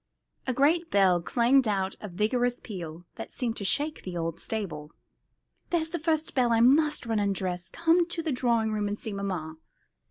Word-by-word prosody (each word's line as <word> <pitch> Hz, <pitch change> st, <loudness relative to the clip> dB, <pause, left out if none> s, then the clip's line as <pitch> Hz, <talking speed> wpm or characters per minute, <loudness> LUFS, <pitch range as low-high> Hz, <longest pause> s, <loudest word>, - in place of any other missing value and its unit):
A 255 Hz, -, +1 dB
great 320 Hz, +6 st, +2 dB
bell 185 Hz, -3 st, +4 dB
clanged 245 Hz, +6 st, +3 dB
out 195 Hz, -2 st, 0 dB
with 210 Hz, -, -7 dB
a -, -, -14 dB
vigorous 245 Hz, +4 st, +1 dB
peal, 175 Hz, -5 st, -8 dB
that -, -, -6 dB
seemed 235 Hz, -3 st, -2 dB
to -, -, -4 dB
shake 295 Hz, +10 st, 0 dB
the 180 Hz, -2 st, -6 dB
old 165 Hz, 0 st, -3 dB
stable. 165 Hz, -9 st, -4 dB, 0.8 s
"There's 325 Hz, -2 st, 0 dB
the 345 Hz, -, -3 dB
first 315 Hz, 0 st, 0 dB
bell. 245 Hz, -3 st, +2 dB
I 230 Hz, -, +4 dB
must 295 Hz, +4 st, +4 dB
run 225 Hz, -2 st, 0 dB
and 200 Hz, -1 st, +1 dB
dress. 180 Hz, -1 st, -3 dB
Come 335 Hz, +1 st, +2 dB
to 340 Hz, -1 st, -2 dB
the 315 Hz, -, -1 dB
drawing 235 Hz, -3 st, +1 dB
room 210 Hz, -1 st, -1 dB
and 205 Hz, +1 st, -3 dB
see 220 Hz, -, -6 dB
mamma." 180 Hz, -6 st, -4 dB
225 Hz, 195 wpm, -28 LUFS, 190-280 Hz, 0.8 s, bell